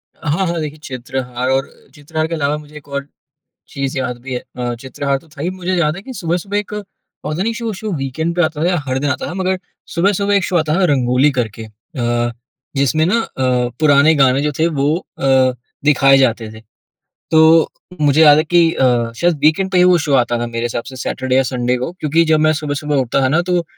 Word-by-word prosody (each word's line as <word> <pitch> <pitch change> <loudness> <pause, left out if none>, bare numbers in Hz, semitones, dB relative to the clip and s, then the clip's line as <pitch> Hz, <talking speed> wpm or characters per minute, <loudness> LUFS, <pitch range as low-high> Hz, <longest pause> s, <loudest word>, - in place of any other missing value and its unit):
हाँ, 165 +5 -1
हाँ। 170 0 -2
देखिए, 155 -1 -5
चित्रहार 125 -1 -4
और 135 +1 0 0.3
चित्रहार 155 +2 -3
के 165 - -5
अलावा 145 -1 0
मुझे 150 0 -13
एक 145 -1 -14
और 140 0 -4 0.6
चीज़ 135 0 -4
याद 125 -2 -3
भी 135 -1 -5
है। 125 - -4
अ, 120 -1 -2
चित्रहार 135 +1 -2
तो 160 - -22
था 145 -1 -9
ही 175 - -1
मुझे 185 0 -3
याद 155 -2 +1
है 190 - -8
कि 260 - -8
सुबह-सुबह 180 +2 -2
एक 210 0 -5 0.5
पता 155 +4 -2
नहीं 230 +3 0
शो 230 -1 -3
शो, 215 +3 -5
वीकेंड 150 +5 -3
पे 175 - +3
आता 155 -2 -1
था - - +2
या 180 - +1
हर 130 0 -1
दिन 145 +1 -1
आता - - -2
था, - - -6
मगर 190 0 -1 0.4
सुबह-सुबह 200 +3 +1
एक 200 -1 +2
शो 180 - -1
आता 155 -2 +1
था - - +3
रंगोली 130 +2 +3
करके 110 -2 -3
अ, 120 +1 -3 0.5
जिसमें 140 +3 +2
ना 215 +6 +2
अ, 125 - -1
पुराने 155 +1 +5
गाने 135 -2 +3
जो 150 0 0
थे 160 - +3
वो 145 +3 +2 0.2
अ, 130 -1 +3 0.3
दिखाए 135 -2 +5
जाते 115 -4 +1
थे। 110 - -12 0.7
तो 160 0 +5 0.3
मुझे 145 +1 +4
याद 150 -1 +8
है 155 - +3
कि 170 0 +3
अ, 120 -3 +1
शायद 170 +2 +1
वीकेंड 175 +5 +3
पे 185 - +2
ही 180 - +6
वो 180 -1 +5
शो 145 - 0
आता 120 -2 +2
था 120 - -2
मेरे 115 0 -3
हिसाब 120 0 -3
से 130 - -10
सैटरडे-संडे 125 0 0
को, 130 +6 -4
क्योंकि 165 -1 +1
जब 155 - +4
मैं 155 0 +3
सुबह-सुबह 150 0 -2
उठता 130 0 +1
था 130 - +3
ना 155 +6 +2
तो, 175 -1 0
145 Hz, 220 wpm, -17 LUFS, 130-170 Hz, 0.7 s, याद